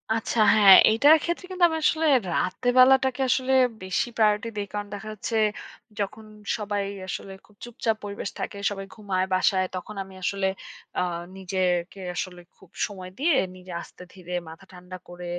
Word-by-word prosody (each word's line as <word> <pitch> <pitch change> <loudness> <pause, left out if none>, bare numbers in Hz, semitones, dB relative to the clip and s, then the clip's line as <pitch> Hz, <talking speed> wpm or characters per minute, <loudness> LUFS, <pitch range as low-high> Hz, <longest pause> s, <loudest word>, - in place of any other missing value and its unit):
আচ্ছা, 225 +1 -2 0.2
হ্যাঁ। 200 -3 +9 0.2
এটার 290 +8 +6
ক্ষেত্রে 345 +2 -3
কিন্তু 370 -1 -1
আমি 320 - -2
আসলে 320 +1 +2 0.3
রাতের 245 +9 0
বেলাটাকে 265 0 +5
আসলে 260 +1 +1 0.3
বেশি 185 +5 -1
প্রায়োরিটি 215 +1 +2
দেই। 205 -1 -3
কারণ 205 0 -4
দেখা 205 +1 -7
হচ্ছে 220 +2 -3 0.6
যখন 210 +2 -4 0.3
সবাই 205 -2 -2 0.2
আসলে 195 +1 -6
খুব 210 - -25
চুপচাপ 230 -2 -2
পরিবেশ 200 -1 -5
থাকে। 200 - -5
সবাই 195 -1 -6
ঘুমায় 195 -4 -1
বাসায় 185 0 +2
তখন 195 +3 -7
আমি 190 0 -15
আসলে 195 +1 0 0.5
আ - - +2 0.4
নিজেকে 185 0 -1 0.2
আসলে 180 -1 -4 0.2
খুব 190 - -20 0.2
সময় 185 -3 -9
দিয়ে 310 +1 +3 0.2
নিজে 185 0 -12
আস্তে - - -13
ধীরে 180 -2 -9 0.2
মাথা 165 +4 -13
ঠান্ডা 180 0 -10
করে, 175 0 -9
205 Hz, 160 wpm, -25 LUFS, 185-230 Hz, 0.6 s, হ্যাঁ